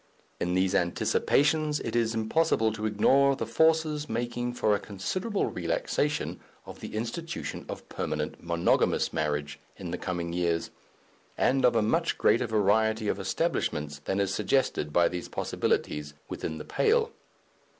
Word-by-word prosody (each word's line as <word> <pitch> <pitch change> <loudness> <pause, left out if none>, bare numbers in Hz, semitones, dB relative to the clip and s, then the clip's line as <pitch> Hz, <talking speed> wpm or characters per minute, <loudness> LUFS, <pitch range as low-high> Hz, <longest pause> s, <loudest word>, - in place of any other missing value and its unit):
In 90 +1 0
these 95 +1 +2
Anticipations 145 - +2
it - - -4
is 115 -1 +1
impossible 110 -1 +2
to 110 0 -2
ignore 135 +6 +4
the - - -3
forces 160 -2 +2
making 120 0 -2
for 110 -3 +2
a 100 - +1
considerable 185 - -2
relaxation 150 - -1 0.3
of - - -10
the - - -7
institution 120 +10 -4
of - - -7
permanent 75 0 -4
monogamous 85 0 +1
marriage 75 -1 -2 0.2
in 90 -3 -6
the 90 - -3
coming 85 -2 -3
years, 85 -2 0 0.7
and 135 +1 +2
of 120 -1 +4
a 115 - +3
much 105 - +1
greater - - +3
variety 110 +1 +2
of - - -1
establishments 75 -1 -1
than 95 - 0
is 100 -1 0
suggested 105 - 0
by 85 +2 +4
these 90 -1 -5
possibilities 75 0 -1
within 80 - -4
the 75 - -7
pale. 450 +1 +2
110 Hz, 145 wpm, -28 LUFS, 85-140 Hz, 0.7 s, ignore